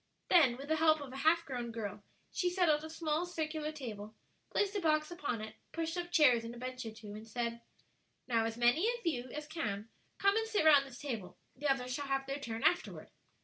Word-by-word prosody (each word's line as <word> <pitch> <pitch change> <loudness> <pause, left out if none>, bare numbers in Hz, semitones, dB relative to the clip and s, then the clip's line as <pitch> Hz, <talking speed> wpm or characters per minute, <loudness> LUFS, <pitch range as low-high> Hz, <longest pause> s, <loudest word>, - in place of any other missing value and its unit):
Then, 280 -9 +6
with 275 +2 -8
the 315 - +2
help 315 -1 +5
of 275 -3 -8
a - - -6
half 325 +4 +3
grown 245 -4 -4
girl, 210 -3 -5 0.3
she 360 - +1
set 355 -1 +2
out 300 0 +3
a 315 - -6
small 320 +1 -1
circular 310 -3 -3
table, 220 -8 -7 0.3
placed 410 0 0
a 400 - 0
box 310 -1 +2
upon 285 -10 -3
it, 220 0 -8 0.2
pushed 330 0 -2
up 350 0 -4
chairs 255 -9 +5
and 230 +1 -6
a - - -10
bench 255 +1 -5
or - - -5
two, 215 -1 -10
and 215 +1 -9
said, 235 +1 -3 0.7
"Now, 230 -3 +2
as 225 0 -3
many 245 - +4
of 475 - -18
you 255 -6 -1
as 300 +4 -5
can, 220 -10 -3 0.3
come 395 +1 +3
and 445 0 0
sit 425 -7 +1
round 285 -3 +7
this 245 -2 -11
table; 230 -10 -5 0.2
the 290 +3 -2
others 255 -2 +1
shall 285 +2 -3
have 270 0 0
their 275 +1 -3
turn 230 -2 -5
afterward." 355 - +1
280 Hz, 230 wpm, -34 LUFS, 235-320 Hz, 0.7 s, round